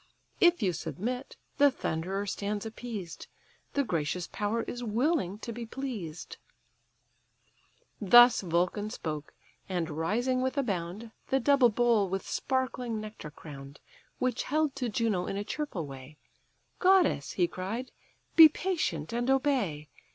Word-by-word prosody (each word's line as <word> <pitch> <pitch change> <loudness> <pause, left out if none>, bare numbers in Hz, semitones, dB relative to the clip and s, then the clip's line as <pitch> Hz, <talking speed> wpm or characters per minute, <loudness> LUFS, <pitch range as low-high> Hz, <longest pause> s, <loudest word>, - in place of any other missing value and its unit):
If 345 -8 +4
you 185 -3 +2
submit, 250 - -4 0.2
the 285 0 +7
thunderer 190 -3 -3
stands 205 +2 -3
appeased; 220 -6 -7 0.5
The 285 - +2
gracious 170 - -2
power 215 +2 -2
is 245 0 -6
willing 235 - 0
to 230 +2 -6
be 235 +1 -6
pleased." 220 - -6 1.6
Thus 240 +4 +7
Vulcan 180 +4 0
spoke: 150 -7 -5 0.3
and 175 -3 -2
rising 230 - 0
with 260 +2 -1
a 280 - +2
bound, 200 +1 -4 0.2
The 270 - +2
double 270 -1 +5
bowl 225 -3 +2
with 195 0 -3
sparkling 250 -3 -1
nectar 215 -7 -8
crown'd, 140 -1 -11 0.4
Which 255 -1 0
held 305 -1 0
to 250 -3 -1
Juno 210 -4 0
in 195 - -3
a 205 - -2
cheerful 210 - -4
way, 135 +1 -11 0.6
"Goddess 365 - +3
(he 175 -2 +2
cried), 200 +9 -5 0.4
be 320 -1 +11
patient 295 - -2
and 240 +2 -1
obey. 255 - +1
215 Hz, 135 wpm, -29 LUFS, 175-255 Hz, 1.6 s, be